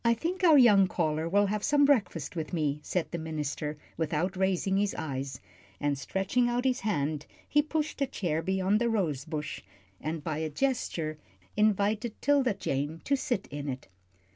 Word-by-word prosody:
"I 235 0 +4
think 360 - -3
our 320 -4 +8
young 205 -7 +7
caller 160 -2 -1
will 205 +3 +4
have 205 +1 -1
some 290 -1 +4
breakfast 195 - +1
with 160 +1 -4
me," 150 -3 0
said 175 +3 -2
the 170 - -3
minister, 150 -1 -3 0.2
without 160 +3 -1
raising 190 0 +1
his 205 0 +1
eyes, 135 -4 -4 0.4
and 145 -1 +1
stretching 195 - 0
out 245 +1 -1
his 255 -1 +2
hand 155 -7 -1 0.2
he 295 - +4
pushed 310 0 -2
a 275 - +3
chair 170 - -1
beyond 190 +4 +1
the 235 - +2
rose 160 - 0
bush, 150 -3 -4 0.4
and 155 0 -3
by 155 -1 -2
a 160 0 -2
gesture 160 - -1 0.4
invited 215 +2 +1
'Tilda 275 -6 +3
Jane 145 -2 -2
to 280 - +2
sit 245 -6 -1
in 145 0 -4
it. 130 -6 -6
185 Hz, 175 wpm, -29 LUFS, 155-235 Hz, 0.4 s, our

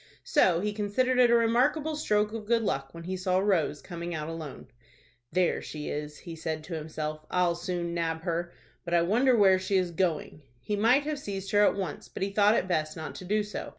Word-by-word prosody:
So 180 - +3
he 210 +1 -1
considered 235 +5 +1
it 245 -1 +6
a 235 - +5
remarkable 260 +7 +2
stroke 210 -6 +1
of 220 -2 -6
good 230 0 +2
luck 135 -8 -2
when 170 +2 -9
he 185 +2 -3
saw 185 0 0
Rose 185 -7 +1
coming 170 -1 -5
out 155 -1 -4
alone. 160 -4 -7 0.7
"There 180 -1 +1
she 150 -1 -6
is," 150 0 -5
he 170 -2 -8
said 160 -1 -4
to 170 - -8
himself. 155 -1 -4
"I'll 180 -1 +2
soon 175 0 -3
nab 165 -1 -2
her. 170 0 -2 0.3
But 170 0 -1
I 170 - +4
wonder 240 +7 +3
where 190 -3 +5
she 190 +1 0
is 180 -2 0
going." 165 -3 -1 0.2
He 210 - -2
might 235 +7 +4
have 300 -1 -3
seized 195 -6 -5
her 205 0 +5
at - - +4
once, 190 -6 -4
but - - -4
he 195 - -1
thought 210 +1 +5
it 185 - 0
best 155 -3 -1
not 160 - -6
to 185 - -9
do 210 +3 +1
so. 210 - -6
185 Hz, 220 wpm, -28 LUFS, 165-210 Hz, 0.7 s, it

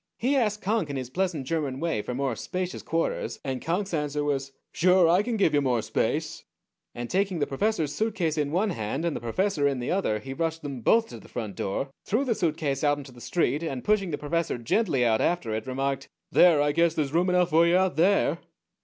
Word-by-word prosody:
He 265 +5 +1
asked 210 -5 0
Conk 205 -5 0
in 140 - -4
his 130 -2 -5
pleasant 175 -4 -1
German 140 -3 -2
way 165 -10 -1
for 125 - -5
more 135 -2 -1
spacious 185 +8 -4
quarters, 165 0 -2
and 130 -2 -3
Conk's 180 +4 -2
answer 150 -1 -1
was, 135 -2 -1 0.2
'Sure 180 0 +4
I 175 +4 +4
can 230 +1 -2
give 180 -7 +3
ya 145 - +3
more 125 -5 +1
space.' - - -1 0.5
And 120 0 -4
taking 190 +2 0
the 145 - +1
professor's 155 +1 -1
suitcase 200 -8 -1
in 145 -2 -1
one 195 +5 +1
hand, 135 +3 -3
and 170 - -1
the - - -3
professor 150 - 0
in 140 -2 0
the 120 - -3
other, 180 - +1
he 135 +5 -7
rushed 165 +1 -2
them 140 -4 -5
both 225 - +3
to 115 - -9
the - - -16
front 110 -5 -5
door, 135 +8 -3
threw 230 +7 0
the 245 - +2
suitcase 155 -8 -1
out 145 -1 +3
into 140 -2 -9
the 120 -1 -14
street, 160 -1 0
and, 135 -7 -4
pushing 210 -3 +2
the 145 - -2
professor 165 -1 -1
gently 135 - +1
out 110 -2 +2
after 170 -11 0
it, 110 +3 -4
remarked, 135 +1 -2 0.2
'There 165 -5 +6
I 145 - +2
guess 165 +1 +2
there's 145 -2 -1
room, 175 +3 +2
enough 180 -1 +2
for 165 +2 +5
ya 180 +2 +4
out 190 -6 -1
there.'" 185 +6 +3
155 Hz, 225 wpm, -26 LUFS, 135-185 Hz, 0.5 s, There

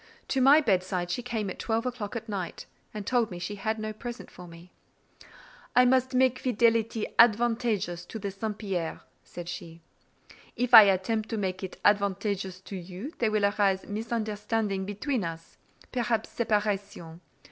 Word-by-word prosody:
To 265 - +1
my 280 +4 +7
bedside 185 - 0
she 245 - -2
came 230 -4 -3
at - - -9
twelve 225 +1 -1
o'clock 245 -4 -4
at 225 0 -5
night, 195 -5 -5 0.3
and 210 -3 -6
told 240 -1 +1
me 180 - -7
she 180 +4 -4
had 220 +2 -2
no 215 0 -4
present 240 +3 -8
for 180 0 -11
me: 170 +1 -14 1.0
"I 250 - +7
must 255 0 +2
make 255 0 +3
fidelity 230 -2 +1
advantageous 225 -6 +3
to - - -7
the 200 -2 -4
St. 210 +2 -4
Pierre," 185 -6 -3 0.2
said 175 -1 -9
she; 170 -2 -8 0.7
"if 250 0 -2
I 215 - +12
attempt 210 +3 0
to 225 - -2
make 190 -2 -3
it 190 - -6
advantageous 200 -2 +1
to 195 - -8
you, 190 - -7
there 230 - +2
will 215 -1 +2
arise 200 -2 +1
misunderstanding 215 -2 -2
between 210 +4 -2
us—perhaps 215 +7 -4
separation. 205 -7 -2
210 Hz, 160 wpm, -28 LUFS, 190-230 Hz, 1.0 s, I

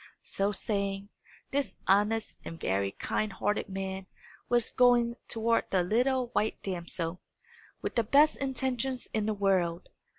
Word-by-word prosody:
So 195 +1 0
saying, 200 -1 -2 0.4
this 275 -8 -1
honest 210 +3 +2
and 165 - -7
very 100 +1 0
kind 215 0 -1
hearted 205 +2 -1
man 190 0 -4 0.4
was 240 -2 +2
going 240 -2 +4
toward 230 0 +1
the 185 -2 +2
little 250 +6 +1
white 220 -2 0
damsel, 175 -2 -3 0.6
with - - -2
the 235 - +2
best 285 +8 +5
intentions 265 -1 -2
in 215 -1 0
the 215 - 0
world. 185 -4 +1
210 Hz, 135 wpm, -30 LUFS, 190-240 Hz, 0.6 s, best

